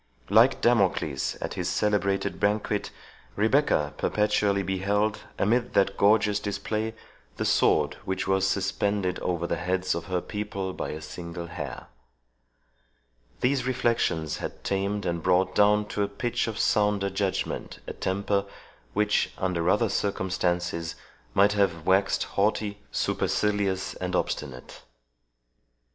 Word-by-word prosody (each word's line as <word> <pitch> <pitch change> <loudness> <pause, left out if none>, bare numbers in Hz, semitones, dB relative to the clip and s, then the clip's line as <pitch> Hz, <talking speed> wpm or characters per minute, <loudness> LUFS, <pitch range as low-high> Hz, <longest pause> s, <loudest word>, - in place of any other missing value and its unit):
Like - - +5
Damocles 95 - +2
at - - -3
his 90 0 -2
celebrated 100 0 0
banquet, 105 0 0 0.5
Rebecca 110 - +2
perpetually 105 -1 +1
beheld, 100 +3 0 0.2
amid 120 +4 +1
that 100 0 +3
gorgeous 105 0 +3
display, 105 +2 -3 0.4
the - - -1
sword - - +3
which 95 - -2
was 95 0 +2
suspended 100 -1 0
over 85 -2 -1
the - - -1
heads 90 +1 0
of 85 0 -4
her 90 0 -1
people 100 -1 -4
by - - -4
a 75 - -5
single 85 +1 -7
hair. 85 - -6 1.6
These 130 0 +1
reflections 115 - 0
had - - -6
tamed 100 +1 -1
and 85 -1 -1
brought 90 +2 +2
down 105 0 +4
to 105 - -2
a 100 - +2
pitch 105 +5 -2
of 110 - -4
sounder 105 -2 +2
judgment 95 0 -2
a - - -5
temper, 100 +1 -1 0.5
which, 105 0 +2
under 90 -2 0
other - - +3
circumstances, 90 -4 -1 0.4
might 100 +1 +5
have 90 -6 +1
waxed 95 +1 +3
haughty, 105 0 0
supercilious, 100 -3 0
and 90 0 -3
obstinate. 65 -7 -3
100 Hz, 125 wpm, -27 LUFS, 90-105 Hz, 1.6 s, Like